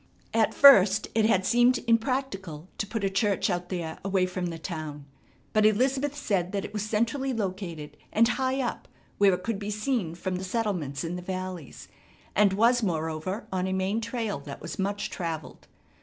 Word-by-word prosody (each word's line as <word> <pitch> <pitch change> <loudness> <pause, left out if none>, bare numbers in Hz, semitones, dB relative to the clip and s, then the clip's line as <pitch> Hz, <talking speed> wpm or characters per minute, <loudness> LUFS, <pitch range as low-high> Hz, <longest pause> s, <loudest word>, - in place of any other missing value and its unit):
At 225 -1 +2
first 215 -7 +7
it 220 -1 +3
had 190 -4 +3
seemed 240 +3 +4
impractical 225 - -1
to 205 - -1
put 220 0 -3
a 195 - +2
church 200 +1 +1
out 175 0 -3
there 170 -4 -4
away 190 -1 +2
from 185 -1 -3
the 165 -1 -5
town, 155 -4 -6 0.5
but 215 - +4
Elizabeth 265 +7 +2
said 195 -9 -1
that 200 0 -1
it - - -9
was 210 - -2
centrally 235 +6 0
located, 185 -8 -4 0.2
and 230 +1 +4
high 260 +2 0
up 245 - -4 0.3
where 200 -2 +6
it 180 - -9
could 225 -2 -2
be 205 0 -4
seen 210 -5 -1
from 180 +1 -3
the 185 - -5
settlements 185 - -2
in 170 +2 -3
the - - -6
valleys, 185 -4 -6 0.5
and 200 -1 +4
was 235 +4 +4
moreover 165 +2 -2
on 185 0 0
a 190 - -1
main 190 +4 0
trail 225 - -3
that 140 0 -9
was 165 - -7
much 200 +1 -2
travelled. 165 -4 -5
195 Hz, 185 wpm, -27 LUFS, 180-225 Hz, 0.5 s, first